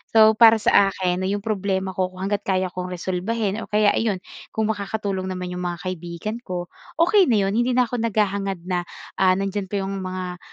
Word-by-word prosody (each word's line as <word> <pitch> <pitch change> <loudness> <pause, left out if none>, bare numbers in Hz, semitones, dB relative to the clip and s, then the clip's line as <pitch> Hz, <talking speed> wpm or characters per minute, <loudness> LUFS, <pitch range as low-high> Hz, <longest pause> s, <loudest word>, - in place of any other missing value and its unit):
So, 220 0 +8
para 225 -1 +9
sa 200 -2 +4
akin 180 -1 -1
'no 185 - -1
yung 200 +1 -2
problema 195 -3 -1
ko 185 0 0
kung 185 +1 -9
hangga't 200 +1 -1
kaya 185 -1 0
kong 180 0 -5
resolbahin 190 +4 -2
or - - -7
kaya, 210 0 +3
ayun, 205 -4 -1 0.3
kung 220 0 +1
makakatulong 200 -2 -3
naman 180 -1 -4
yung 180 0 -4
mga 175 0 -3
kaibigan 180 +4 -5
ko, 175 -1 -4 0.2
okey 365 +3 +4
na 235 - +3
yun. - - 0
Hindi 245 +1 +2
na 250 - +5
ako 245 0 -3
naghahangad 195 -4 -1
na, 175 -1 -2 0.3
ah, 185 -1 +5
nandiyan 195 0 -2
pa 195 0 -2
yung 195 0 -3
mga, 185 -1 -5
195 Hz, 205 wpm, -23 LUFS, 185-215 Hz, 0.3 s, para